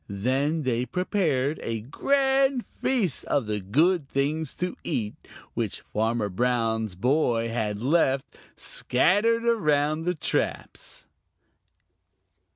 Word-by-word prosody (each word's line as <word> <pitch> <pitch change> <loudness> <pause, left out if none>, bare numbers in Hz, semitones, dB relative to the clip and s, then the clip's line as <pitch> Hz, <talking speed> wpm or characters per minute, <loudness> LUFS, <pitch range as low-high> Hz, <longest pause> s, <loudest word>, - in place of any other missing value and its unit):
Then 135 +10 0
they 125 -1 0
prepared 160 - 0
for - - -10
a 115 -1 -3
grand 270 - +1
feast 215 - -1
of 140 -5 0
the 105 0 -2
good 150 - +2
things 150 +3 -1
to 180 0 -3
eat 110 -9 -2 0.4
which - - -3
Farmer 110 0 -1
Brown's 110 -1 0
boy 120 - +1
had 105 -3 -2
left, 135 -2 +2 0.3
scattered 210 - +2
around 155 -9 +2
the 180 0 0
traps. 150 - -3
140 Hz, 110 wpm, -26 LUFS, 115-180 Hz, 0.4 s, good